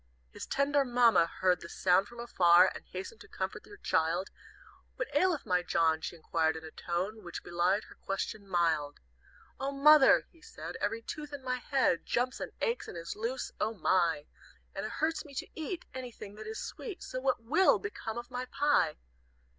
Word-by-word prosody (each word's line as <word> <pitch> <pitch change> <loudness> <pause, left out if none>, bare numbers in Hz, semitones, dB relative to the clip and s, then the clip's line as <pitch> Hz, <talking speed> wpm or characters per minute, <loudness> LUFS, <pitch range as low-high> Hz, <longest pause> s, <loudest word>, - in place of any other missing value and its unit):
"His - - -8
tender 280 +1 +2
Mamma 240 -8 +4
Heard 180 0 +1
the 170 - -9
sound 185 +3 +3
from 240 +2 -12
afar, 180 -6 +5
And - - -9
hastened 190 - -7
to - - -13
comfort - - -5
her 410 - -12
child; 170 - 0 0.6
'What - - -5
aileth 365 -5 +2
my 180 -1 +2
John?' 160 -2 +2
She - - -5
inquired 160 -1 0
in 160 - -7
a 160 - -9
tone 190 +7 -3
Which 175 -1 -7
belied 175 +4 +1
her - - -14
question 200 +1 -4
mild. 165 -5 +1 0.6
"'Oh, 270 +1 -1
Mother,' 280 0 +7
he 330 - -23
said, - - -8
'Every 230 0 -1
tooth 300 +3 -6
in 280 -2 -6
my 255 -1 -1
head 255 - +1
Jumps 250 +2 -1
and - - -5
aches 470 +1 -1
and - - -7
is 170 0 -5
loose, 235 +4 -3
O 220 +1 0
my! 170 -4 +2 0.5
And - - -3
it - - -8
hurts 325 +1 0
me 280 -3 -13
to - - -3
eat 325 +2 -5
Anything 245 -5 -8
that 215 +1 -9
is 220 - -5
sweet 425 -7 -7
So 255 - -4
what 260 -3 0
will 370 +11 +4
become 235 - -5
of 240 +1 -7
my 250 +1 -3
pie?' 290 +3 +2
225 Hz, 190 wpm, -31 LUFS, 175-275 Hz, 0.6 s, Mother